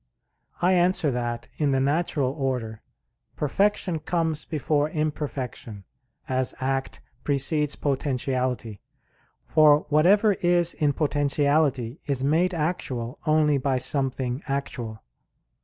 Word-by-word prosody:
I 185 Hz, +1 st, +4 dB
answer 180 Hz, -3 st, +2 dB
that, 120 Hz, -1 st, -3 dB
In 150 Hz, -2 st, +2 dB
the 135 Hz, -1 st, +2 dB
natural 140 Hz, -1 st, 0 dB
order, 130 Hz, -6 st, -3 dB, 0.5 s
perfection 180 Hz, +2 st, 0 dB
comes 160 Hz, -1 st, -1 dB
before 150 Hz, -1 st, 0 dB
imperfection, 140 Hz, -9 st, -4 dB, 0.4 s
as 130 Hz, 0 st, -1 dB
act 135 Hz, 0 st, -2 dB, 0.2 s
precedes 150 Hz, +1 st, +1 dB
potentiality; 130 Hz, -5 st, -2 dB, 0.6 s
for 150 Hz, -1 st, +5 dB
whatever 195 Hz, +8 st, +4 dB
is 175 Hz, -2 st, +2 dB
in 145 Hz, -2 st, +1 dB
potentiality 145 Hz, -3 st, +1 dB
is 135 Hz, -2 st, 0 dB
made 170 Hz, +6 st, +2 dB
actual 135 Hz, -7 st, -3 dB
only 155 Hz, -2 st, +3 dB
by 135 Hz, 0 st, 0 dB
something 130 Hz, 0 st, -2 dB
actual. 125 Hz, -5 st, -4 dB
145 Hz, 105 wpm, -25 LUFS, 130-155 Hz, 0.6 s, for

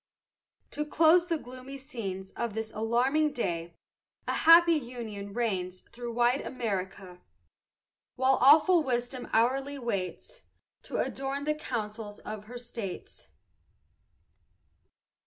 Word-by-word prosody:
To 300 Hz, -, -2 dB
close 330 Hz, +3 st, +4 dB
the 335 Hz, -2 st, 0 dB
gloomy 255 Hz, 0 st, -9 dB
scenes 200 Hz, -9 st, -6 dB
Of 235 Hz, -3 st, -4 dB
this 220 Hz, 0 st, -4 dB
alarming 255 Hz, +8 st, +1 dB
day, 170 Hz, -9 st, -3 dB, 0.5 s
A -, -, 0 dB
happy 335 Hz, +1 st, +7 dB
union 235 Hz, -8 st, -5 dB
reigns 190 Hz, -5 st, -2 dB
Through 240 Hz, 0 st, -8 dB
wide 240 Hz, +3 st, +2 dB
America. 190 Hz, -6 st, -4 dB, 0.9 s
While 260 Hz, +1 st, +3 dB
awful 315 Hz, +6 st, +7 dB
Wisdom 245 Hz, -2 st, -2 dB
hourly 270 Hz, +5 st, +1 dB
waits 235 Hz, -, -4 dB, 0.4 s
To -, -, -4 dB
adorn 275 Hz, +1 st, -2 dB
the 305 Hz, +1 st, +1 dB
councils 215 Hz, -7 st, -5 dB
of 215 Hz, -1 st, -7 dB
her 245 Hz, +3 st, -8 dB
states. 230 Hz, -6 st, -7 dB
240 Hz, 110 wpm, -29 LUFS, 210-275 Hz, 0.9 s, happy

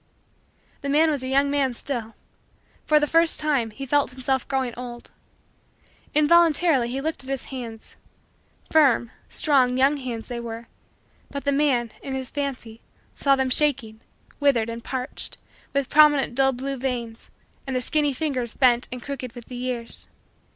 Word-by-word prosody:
The 280 Hz, -, -3 dB
man 310 Hz, +3 st, +4 dB
was 285 Hz, -3 st, -2 dB
a 260 Hz, -, -5 dB
young 275 Hz, +2 st, +2 dB
man 275 Hz, -3 st, +1 dB
still. 230 Hz, -4 st, -4 dB, 0.7 s
For 305 Hz, -1 st, +5 dB
the 295 Hz, -, +2 dB
first 330 Hz, +2 st, +3 dB
time, 285 Hz, -7 st, +1 dB
he 245 Hz, +6 st, -7 dB
felt 285 Hz, +2 st, +2 dB
himself 260 Hz, 0 st, -1 dB
growing 265 Hz, -3 st, -1 dB
old. 240 Hz, -1 st, -8 dB, 1.0 s
Involuntarily 315 Hz, -3 st, +4 dB
he 260 Hz, +2 st, -3 dB
looked 315 Hz, 0 st, -3 dB
at 260 Hz, -, -10 dB
his 270 Hz, -2 st, -3 dB
hands; 230 Hz, -4 st, -8 dB, 0.7 s
firm, 270 Hz, -6 st, +4 dB, 0.2 s
strong, 260 Hz, -4 st, +2 dB
young 275 Hz, +3 st, +3 dB
hands 245 Hz, -4 st, -6 dB
they 245 Hz, -2 st, -5 dB
were, 230 Hz, 0 st, -7 dB, 0.6 s
but 280 Hz, -, -5 dB
the 280 Hz, -, +1 dB
man, 270 Hz, -5 st, +1 dB
in 270 Hz, -, -5 dB
his 260 Hz, -1 st, -4 dB
fancy, 255 Hz, -6 st, -4 dB, 0.3 s
saw 275 Hz, -1 st, +3 dB
them 265 Hz, -1 st, 0 dB
shaking, 250 Hz, -6 st, +2 dB, 0.4 s
withered, 260 Hz, -6 st, +2 dB
and 230 Hz, 0 st, -6 dB
parched, 255 Hz, +1 st, -3 dB, 0.3 s
with 280 Hz, -2 st, 0 dB
prominent 295 Hz, -4 st, +5 dB
dull 270 Hz, +1 st, +3 dB
blue 270 Hz, +2 st, -4 dB
veins, 240 Hz, -3 st, -4 dB, 0.4 s
and 265 Hz, -, -2 dB
the -, -, +2 dB
skinny 295 Hz, +2 st, +1 dB
fingers 260 Hz, -5 st, -2 dB
bent 245 Hz, -2 st, +3 dB
and 250 Hz, -1 st, -6 dB
crooked 260 Hz, -4 st, -6 dB
with 240 Hz, -1 st, -11 dB
the 250 Hz, -, -7 dB
years. 245 Hz, -1 st, -4 dB
265 Hz, 160 wpm, -24 LUFS, 240-285 Hz, 1.0 s, For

